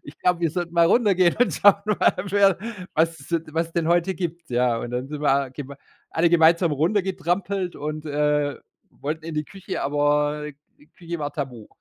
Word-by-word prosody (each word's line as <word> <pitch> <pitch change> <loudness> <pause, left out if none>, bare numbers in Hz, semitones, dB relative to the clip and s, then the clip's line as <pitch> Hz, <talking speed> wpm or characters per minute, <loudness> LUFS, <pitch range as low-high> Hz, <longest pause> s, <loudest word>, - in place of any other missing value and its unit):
Ich 145 - -13
glaube, 180 -1 +1
wir 165 -2 +1
sollten 175 0 -4
mal 170 -1 +5
runtergehen 185 -4 +3
und 245 - +3
schauen 205 -1 +6
mal, 210 -1 +3
wer 195 -1 +3 0.4
was 165 +1 +1
es 140 - -14
so 170 - +2
de 155 -1 -15
was 165 0 0
es - - -22
denn 165 -1 0
heute 175 +2 +2
gibt.“ 170 -2 -5
Ja, 120 -1 +2
und 120 - -5
dann 125 +2 -3
sind 150 0 -6
wir 145 - +3
alle 140 -1 0
gemei 140 0 -8 0.3
alle 165 +1 +2
gemeinsam 170 0 +4
runtergetrampelt 185 +2 -1
und, 155 +1 -5
äh, 150 -1 0 0.3
wollten 155 +2 -5
in 165 -1 -6
die 150 0 -1
Küche, 195 +4 -6
aber 145 +1 0 0.3
die 145 - -21
Küche 170 +1 -7
war 145 -1 -4
tabu. 125 -7 -6
160 Hz, 205 wpm, -23 LUFS, 145-175 Hz, 0.4 s, schauen